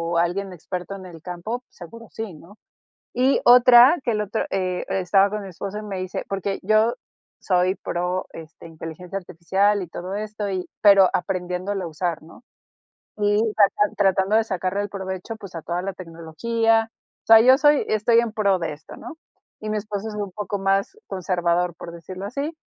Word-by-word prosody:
o - - +2
alguien 185 +3 -1
experto 180 +3 -6
en 190 -1 -10
el 165 -3 -11
campo, 180 +8 -5
seguro 230 +6 -12
sí, 220 -4 -6
¿no? 170 +7 -15 0.6
Y 260 +2 +3
otra 245 +5 +8
que 235 - 0
el 210 0 0
otro, 210 +2 -2
eh, 185 -2 -2
estaba 195 +1 +3
con 210 0 -4
mi 195 - -8
esposo 195 +3 -6
y - - -6
me 200 -3 -5
dice, 185 0 -4
porque 195 0 -3
yo 215 +3 +3 0.5
soy 185 0 +2
pro, 180 0 -3
este, 165 +1 -11
inteligencia 165 +4 -7
artificial 190 +3 0
y 180 - -7
todo 180 +3 -6
esto, 210 0 -4
y 185 -2 -3
pero 200 -2 +7
aprendiéndolo 185 +1 -2
a - - -3
usar, 165 +1 -3
¿no? 165 +9 -16 0.8
Y 205 0 +2 0.2
tratan 210 0 +3
tratando 195 +1 +2
de 225 - +5
sacarle 190 -1 -2
el 205 - -4
provecho, 190 +2 -6
pues, 195 -5 -12
a 165 - -6
toda 175 +1 -3
la 195 +1 -3
tecnología. 225 +7 -1 0.3
O - - -71
sea, 225 0 +9
yo 255 +3 +7
soy 295 0 +4
estoy 220 +2 +3
en 235 -2 +1
pro 200 -3 +2
de 165 -3 -3
esto, 150 +2 -12
¿no? 320 - -10 0.4
Y 215 - -5
mi 215 - -1
esposo 210 0 -4
es 215 - -7
un 205 -2 -4
poco 205 +1 -4
más 195 - 0
conservador, 180 -2 -1
por 170 - -9
decirlo 185 +3 -8
así. 280 +8 -4
195 Hz, 190 wpm, -23 LUFS, 180-215 Hz, 0.8 s, sea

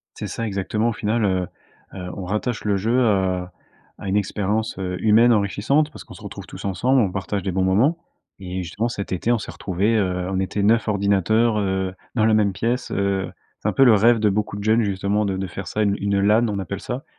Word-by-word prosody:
C'est - - -5
ça, 115 - -4
exactement. 105 +3 -1
Au - - -2
final, 110 +1 -1
heu, 95 -2 +1 0.5
heu, 90 -2 -6
on 95 - -5
rattache 105 +5 -2
le 105 -1 +1
jeu 115 +6 +2
à 95 -3 0 0.4
à - - -7
une 95 - +1
expérience, 105 +2 -1
heu, 90 -1 -3
humaine 115 +3 +5
enrichissante, 110 +9 +1
parce - - -10
qu'on - - -13
se - - -13
retrouve - - -8
tous - - -10
ensemble, 120 +8 +2
on 100 -5 +1
partage 100 0 -3
des 95 - -1
bons 95 +1 0
moments 110 - +3 0.4
et 90 -1 -4
justement, 105 +7 -2
cet 100 -5 -5
été 95 +6 -1
on 120 - +3
s'est 105 - -7
retrouvés, 100 +4 0
heu, 90 -3 -1
on 95 - 0
était 100 +1 -1
9 110 +1 +3
ordinateurs, 105 +2 +2
heu, 95 -1 -1 0.2
dans 110 - +3
la 110 - +4
même 105 -2 +3
pièce, 120 +6 -2
heu, 100 -1 -1 0.3
c'est - - -1
un - - +1
peu 135 - +5
le 120 -4 +7
rêve 115 +3 +5
de 105 -1 +2
beaucoup 105 0 -2
de 100 - -6
jeunes 110 +2 +3
justement 100 +1 0
de 95 -1 -1
de 95 0 -3
faire 95 +2 -7
ça, 110 - -1
une 100 -1 +2
une 100 0 +1
LAN, 110 +4 +3
on 100 -2 -2
appelle 100 +1 -5
ça. 130 +4 -5
100 Hz, 235 wpm, -22 LUFS, 95-110 Hz, 0.5 s, le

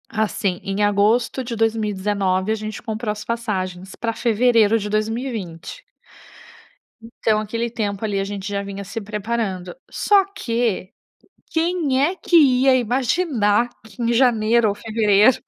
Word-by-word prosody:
Assim, 205 -4 -1
em 195 +1 -1
agosto 215 +5 +2
de 235 -1 -5
2019, 205 -3 0
a - - +2
gente 215 0 -6
comprou 220 -1 -3
as 210 0 -6
passagens 190 -6 -4
para 230 -1 -2
fevereiro 225 -1 +3
de 210 -1 -4
2020. 215 - -4 1.2
Então 225 -2 0
aquele 230 +3 -3
tempo, 210 -3 -3
ali, 205 -2 -1
a - - 0
gente 200 0 -5
já 200 -1 -2
vinha 200 0 -6
se 210 +4 -6
preparando. 205 -3 -3
Só 405 -2 +3
que, 230 - -1 0.6
quem 325 -5 +1
é 345 +6 +1
que 365 - -1
ia 265 -3 +5
imaginar 245 - +1 0.2
que 220 +1 -11
em 235 0 +1
janeiro 230 -2 +3
ou 200 - -2
fevereiro 215 +1 +3
220 Hz, 140 wpm, -21 LUFS, 205-235 Hz, 1.2 s, ia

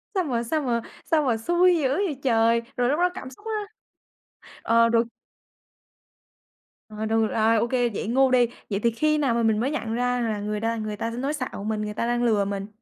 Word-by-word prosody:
Sao 375 - +2
mà 240 -7 -1
sao 305 +7 -1
mà 240 -4 0 0.2
sao 315 -2 +2
mà 245 -5 +1
xui 345 +8 +3
dữ 290 -4 +1
vậy 300 -2 -1
trời! 230 -2 +3 0.2
Rồi 245 0 +2
lúc 295 - +1
đó 360 +1 +3
cảm 265 -8 -7
xúc 265 +12 -17
á 430 -2 -2 1.0
ờ, 230 0 +4
rồi 230 0 +3 1.8
Rồi, 215 0 -5
được 220 0 +2
à, 225 +1 +3
ô 225 +1 +2
kê, 245 -1 +1
vậy 210 - -4
ngu 260 +3 +3
đi. 245 -2 +4 0.2
Vậy 200 -2 -1
thì 235 +2 +2
khi 305 +7 +1
nào 275 -5 +1
mà 235 0 +1
mình 220 -1 +2
mới 260 +5 0
nhận 230 -7 -3
ra 245 +1 0
là 220 -3 -1
người 210 +1 -3
đa 225 +1 -1
người 215 -1 -4
ta 230 +3 -3
sẽ 230 - -7
nói 275 +4 -1
xạo 255 -8 -5
mình, 215 0 -2
người 210 0 -4
ta 220 - -2
đang 240 0 0
lừa 215 -4 +2
mình? 200 0 -4
235 Hz, 230 wpm, -25 LUFS, 225-270 Hz, 1.8 s, ờ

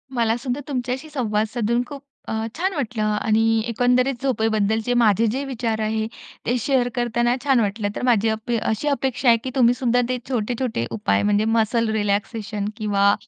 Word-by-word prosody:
मलासुद्धा 240 +3 0
तुमच्याशी 255 +2 -3
संवाद 220 -7 0
साधून 235 0 +1
खूप 280 -1 -8 0.3
अ, - - -2 0.2
छान 380 +3 0
वाटलं 240 -8 -2
आणि 220 +1 +2
एकंदरीत 245 +2 +1
झोपेबद्दलचे 220 -2 +1
माझे 230 -2 +3
जे 265 +4 -2
विचार 235 -4 -2
आहे, 220 0 -1 0.4
ते 245 - +1
शेअर 255 0 +1
करताना 240 0 +1
छान 270 -3 +3
वाटलं. 205 -1 0
तर - - -4
माझी 225 -3 +3
अप 220 +2 -3
अ, 235 - +2
अशी 220 +7 -1
अपेक्षा 270 -2 0
आहे, 230 - +6
की 260 - -3
तुम्हीसुद्धा 245 -1 +3
ते 255 - 0
छोटे-छोटे 240 - -1
उपाय 100 -3 +1
म्हणजे, 205 +1 +2
मसल 225 0 +2
रिलॅक्सेशन 205 0 -1
किंवा 200 -2 +3
230 Hz, 165 wpm, -22 LUFS, 215-250 Hz, 0.4 s, आहे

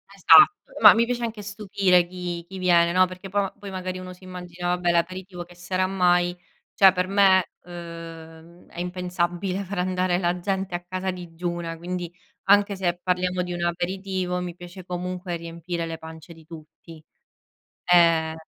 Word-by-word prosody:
Esatto, 415 - +6
ma - - +10
mi 230 +1 +2
piace 240 0 -3
anche 220 -2 -4
stupire 195 -3 +1
chi 175 -1 -5
chi 190 - -9
viene, 170 -2 +4
no, 185 +1 +5
perché 185 +1 -10
po 200 0 -1
poi 200 -1 -9
magari 185 0 -5
uno 185 0 -8
s'immagina: 180 -1 -8
"Vabbè 180 -1 +1
l'aperitivo 180 +1 -2
che 175 0 -17
sarà 185 +1 -1
mai?" 175 -2 +2 0.4
Cioè 195 -1 +7
per 180 0 -1
me, 195 -1 +5 0.2
uhm, 165 -1 -11
è - - -11
impensabile 180 +1 -2
far 195 0 -6
andare 185 0 0
la 175 0 -1
gente 190 0 -2
a 175 - -5
casa 185 +1 -3
digiuna, 170 -1 -5
quindi 175 0 -5 0.4
anche 200 0 +5
se 175 -2 -1
parliamo 180 0 0
di 180 - -5
un 175 0 -3
aperitivo, 180 +1 -2
mi 175 -1 -6
piace 175 +1 -11
comunque 180 0 -4
riempire 170 +1 -5
le 165 0 -5
pance 160 +1 -11
di 160 -1 -18
tutti, 160 0 -13 0.8
ehm 165 -2 +4
180 Hz, 160 wpm, -24 LUFS, 175-185 Hz, 0.8 s, ma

